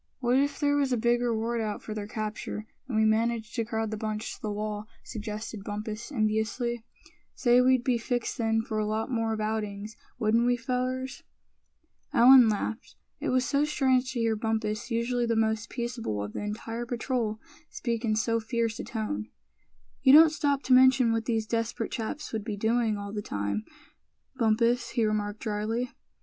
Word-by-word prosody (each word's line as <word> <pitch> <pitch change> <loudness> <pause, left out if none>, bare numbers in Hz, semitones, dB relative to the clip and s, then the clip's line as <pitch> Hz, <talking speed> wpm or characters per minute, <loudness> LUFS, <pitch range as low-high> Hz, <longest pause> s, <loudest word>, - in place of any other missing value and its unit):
"What 250 0 +3
if 285 +1 0
there 290 -1 +2
was 275 -2 +1
a 250 - +2
big 240 +1 +2
reward 230 0 0
out 210 -2 -3
for 215 - -5
their 210 -1 -5
capture, 215 0 -4 0.2
and 235 -5 -2
we 220 - +4
managed 225 +1 +1
to 230 - 0
crowd 220 -1 -2
the 215 - -3
bunch 215 0 -3
to - - -13
the 215 - -3
wall?" 210 0 -4 0.2
suggested 215 -1 -6
Bumpus, 215 +4 -5
enviously. 225 0 -1 0.5
"Say, 245 -1 +4
we'd 255 -1 +4
be 245 -2 +1
fixed 245 +1 -2
then 225 -1 +1
for 220 -1 -3
a 215 - 0
lot 220 +3 -2
more 225 -2 0
of 220 - -2
outings, 215 -1 -3 0.2
wouldn't 230 +1 +2
we, 245 0 +3
fellers?" 255 +2 -2 0.9
Allan 250 -1 +8
laughed. 220 +2 -3 0.2
It - - -2
was 255 0 +2
so 285 0 +2
strange 260 -4 +2
to 245 - -2
hear 225 -1 +2
Bumpus, 220 0 -2
usually 235 +1 0
the 230 - +1
most 220 0 0
peaceable 235 - -3
of 105 - -6
the - - -4
entire 225 +3 -4
patrol, 235 -2 -2 0.3
speak 235 -2 -3
in 215 -2 +1
so 230 +1 +1
fierce 230 0 -2
a - - -3
tone. 110 - -4 0.7
"You 265 - +6
don't 315 +1 +9
stop 285 -2 0
to 260 - +3
mention 255 -2 +6
what 225 -1 -1
these 225 -2 0
desperate 230 0 -2
chaps 235 +6 -4
would 220 -2 -2
be 210 -2 -4
doing 225 0 +1
all 200 0 -6
that 210 -1 -4
time, 100 +1 -2 0.7
Bumpus," 235 0 +2
he 230 - +4
remarked, 210 0 -1
drily. 225 +3 -2
225 Hz, 185 wpm, -28 LUFS, 215-245 Hz, 0.9 s, don't